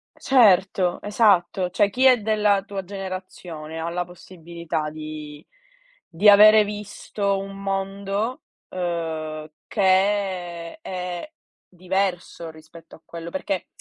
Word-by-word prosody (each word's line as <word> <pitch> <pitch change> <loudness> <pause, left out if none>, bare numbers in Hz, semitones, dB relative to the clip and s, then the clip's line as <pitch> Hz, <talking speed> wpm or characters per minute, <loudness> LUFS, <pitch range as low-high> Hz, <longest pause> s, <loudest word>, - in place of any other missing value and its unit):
Certo, 190 -7 +3
esatto. 195 -4 +2
Cioè 200 +3 +2
chi 255 +5 +1
è 255 -1 +7
della 210 -2 +2
tua 195 -1 -6
generazione 185 -4 -7
ha 165 +1 -3
la 175 +1 -2
possibilità 170 -3 -6
di 155 -1 -9 0.6
di 185 +5 +5
avere 215 +1 +8
visto 205 -1 -3
un 195 0 -7
mondo, 195 +4 -3 0.3
ehm, 160 -3 -4 0.2
che 205 - -2
è 185 - 0
è 180 - -5 0.4
diverso 180 -2 -3
rispetto 160 +1 -15
a - - -20
quello, 170 0 -8
perché 190 +1 -3
185 Hz, 115 wpm, -23 LUFS, 170-200 Hz, 0.6 s, avere